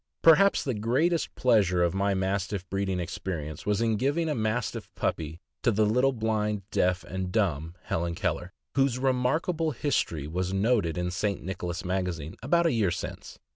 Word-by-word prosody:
Perhaps 180 +5 +6
the. 130 - -1
greatest 130 +11 +1
pleasure 100 -8 +3
of 85 - +1
my 100 +1 +1
Mastiff 95 0 -1
breeding 95 -1 -1
experience 80 -2 -5
was 105 +1 +2
in 115 -2 +2
giving 145 +8 +1
a - - +1
Mastiff 110 -1 -2
puppy 80 +1 -2 0.2
to 120 - +3
the 110 0 +3
little 125 +6 +3
blind, 105 -3 -1
deaf, 90 0 +1
and 95 0 -4
dumb 85 -6 0
Helen 85 0 -2
Keller, 90 +1 -2 0.2
whose 135 -2 +2
remarkable 135 +6 +1
history 120 - -1
was 90 +4 -2
noted 95 -4 +1
in 90 0 -1
St. 100 +2 -1
Nicholas 90 +1 -4
Magazine 90 -4 -2
about 170 +8 +2
a 165 - +3
year 110 -5 +2
since. - - -6
100 Hz, 165 wpm, -28 LUFS, 90-125 Hz, 0.2 s, Perhaps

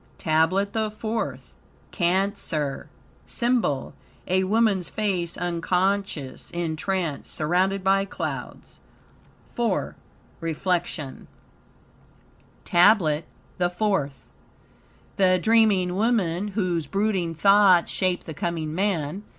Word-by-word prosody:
TABLET 165 +6 +1
THE 220 -1 0
FOURTH 220 +1 -4 0.4
Cancer 175 -6 -1 0.4
SYMBOL 235 - 0 0.3
A 190 +1 +2
woman's 205 -3 +2
face 185 -5 -2
unconscious, 175 -4 -1
in 170 -2 -3
trance, 170 -3 -2
surrounded 185 +5 0
by 195 +1 +3
clouds. - - -6 0.7
IV 240 -1 -1 0.5
REFLECTION 165 -3 -3 1.4
TABLET 175 -4 +4 0.3
THE 175 -1 +2
FOURTH 175 - -1 0.9
The 185 -1 +4
dreaming 205 -3 +3
woman, 200 -3 +1
whose 180 -7 -1
brooding 195 -3 -1
thoughts 195 -1 +5
shape 185 -1 0
the 160 - -7
coming 160 0 -3
man. 185 -2 -1
185 Hz, 90 wpm, -24 LUFS, 165-200 Hz, 1.4 s, thoughts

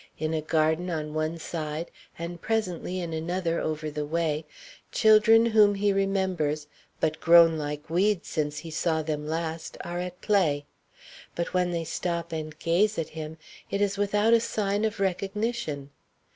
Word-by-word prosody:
In 155 +1 -2
a 160 - 0
garden 160 +3 +1
on 155 -2 -3
one 155 +1 -1
side, 160 0 -4 0.3
and 170 0 -6
presently 185 -5 -1
in 170 -2 -4
another 170 +1 -1
over 155 0 -3
the 150 0 -3
way, 155 0 -1 0.5
children 220 +1 +6
whom 215 -3 +5
he 200 0 +2
remembers 190 -7 0 0.3
but 155 0 0
grown 170 -1 +7
like 150 -1 -4
weeds 190 +3 +1
since 150 -2 -2
he 160 +1 -7
saw 160 0 0
them 150 -1 -3
last 160 0 -3
are 175 +1 -4
at 180 0 -5
play; 155 -9 +2 0.7
but 170 - -3
when 180 -1 +2
they 170 -1 -2
stop 170 +1 -3
and 155 -1 -5
gaze 205 +6 +2
at 160 - -2
him, 155 0 -7 0.3
it 200 - -1
is 200 -1 +1
without 205 +2 +2
a 230 - +7
sign 205 -2 0
of 215 -2 -2
recognition. 195 - -2
170 Hz, 160 wpm, -27 LUFS, 155-195 Hz, 0.7 s, grown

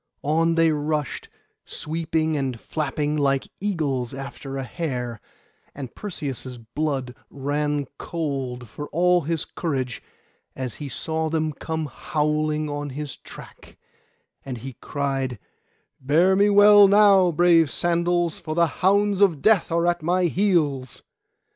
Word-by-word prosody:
On 165 +3 +2
they 165 -1 +4
rushed, 150 -2 -2 0.3
sweeping 160 0 -2
and 130 -5 -2
flapping, 150 +1 -2
like 140 -2 +1
eagles 145 - -2
after 135 0 -7
a 135 - -3
hare; 125 -6 -4 0.5
and 135 -4 -7
Perseus' 135 - -6
blood 130 +2 -3 0.2
ran 145 +1 -1
cold, 135 -7 -4
for 145 +7 -7
all 180 +2 +3
his 160 0 -2
courage, 130 -7 -3 0.5
as 130 -3 -4
he 145 - -7
saw 160 +5 -2
them 155 -1 -1
come 160 +2 -4
howling 150 +1 -1
on 145 0 -4
his 145 +1 -5
track; - - -13 0.7
and 130 -2 -5
he 130 +3 -8
cried, 135 -3 -2 0.6
'Bear 165 +8 +3
me 200 +2 +4
well 205 0 +8
now, 200 -3 +6
brave 165 -1 +4
sandals, 175 0 0
for 155 -2 -5
the 170 0 +4 0.2
hounds 200 +1 +3
of 180 -7 +4
Death 215 -6 +4
are 170 +1 +2
at 175 -1 +1
my 180 +3 +1
heels! 160 - 0
155 Hz, 130 wpm, -24 LUFS, 135-170 Hz, 0.7 s, well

